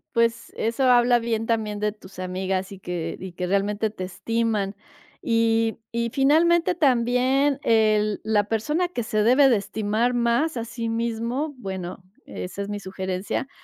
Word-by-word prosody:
Pues, 230 0 +1
eso 230 +4 -1
habla 245 -1 +5
bien, 225 -1 -1
también 215 -2 -1
de 210 0 +1
tus 195 -3 -14
amigas, 185 +1 -2
y 195 - -9
que 175 -3 -4
y 185 -1 -7
que 180 +1 -3
realmente 205 +3 0
te 185 -3 -6
estiman 215 0 -1 0.5
y 225 -1 +1
y 235 0 -1
finalmente 330 +7 +3
también, 265 -1 +2
eh, 215 -2 +3
la 210 -1 +2
persona 295 - 0
que 250 -9 -4
se 215 -1 0
debe 260 +5 +6
de 235 - +4
estimar 220 +4 -1
más, 240 +6 +1
a 230 - -2
sí 235 0 -5
mismo, 235 +6 -2
bueno, 190 -6 -6 0.2
esa 185 +2 -6
es 200 - -4
mi 205 0 -3
sugerencia, 190 +5 -4
225 Hz, 160 wpm, -24 LUFS, 205-245 Hz, 0.5 s, debe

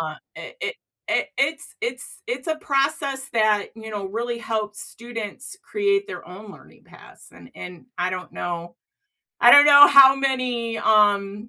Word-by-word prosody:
uh, 155 -1 -5 0.2
i - - -10
i - - -2 0.4
i - - 0
it's 280 +2 -2
it's 470 +2 -6
it's 450 -7 -5
a 315 - -1
process 275 -2 -2
that, 215 -2 +1
you 220 0 -10
know, 205 -2 -5
really 235 +4 -4
helps 215 -2 -4
students 235 - -8
create 400 -1 -1
their - - -9
own 200 +4 -12
learning - - -19
paths, - - -17
and 85 -1 -16
and, 180 +5 -11
I 180 +1 -1
don't 185 0 -7
know 170 0 -6 0.7
I 240 - +7
don't 285 +3 +9
know 290 0 +9
how 270 -1 +7
many, 255 -4 -2
um 205 0 +1
230 Hz, 160 wpm, -22 LUFS, 205-275 Hz, 0.7 s, don't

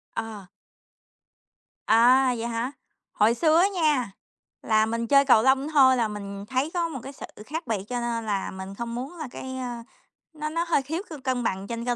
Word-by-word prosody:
Ờ. 220 -3 -5 1.4
À, 250 +4 +5
vậy 230 +1 -3
hả? 235 +2 -2 0.4
Hồi 215 +2 +3
xưa 315 +5 +3
á 370 - +5
nha 295 - +1 0.5
là 220 -1 +3
mình 230 +1 -2
chơi 275 +3 +5
cầu 245 -5 +6
lông 265 +2 +3
thôi 270 -4 +6
là 230 -2 +1
mình 200 -1 -7
thấy 260 +7 -1
có 345 -2 0
một 275 -5 -6
cái 275 - -8
sự - - -8 0.2
khác 315 +4 -5
biệt, 215 -4 -1
cho 245 -1 -2
nên 235 -1 -2
là 200 -3 -2
mình 190 +1 -8
không 235 +1 -5
muốn 265 +8 -6
là 310 -4 -5
cái, 260 0 -7
ơ, 245 -2 -5 0.5
nó 305 0 -4
nó 335 +2 -1
hơi 335 - +2
thiếu 320 +6 -3
sự 315 - -7
cân 255 -2 -1
bằng 190 -2 -2
trên 235 +1 -5
cơ 245 -1 0
245 Hz, 205 wpm, -25 LUFS, 225-280 Hz, 1.4 s, cầu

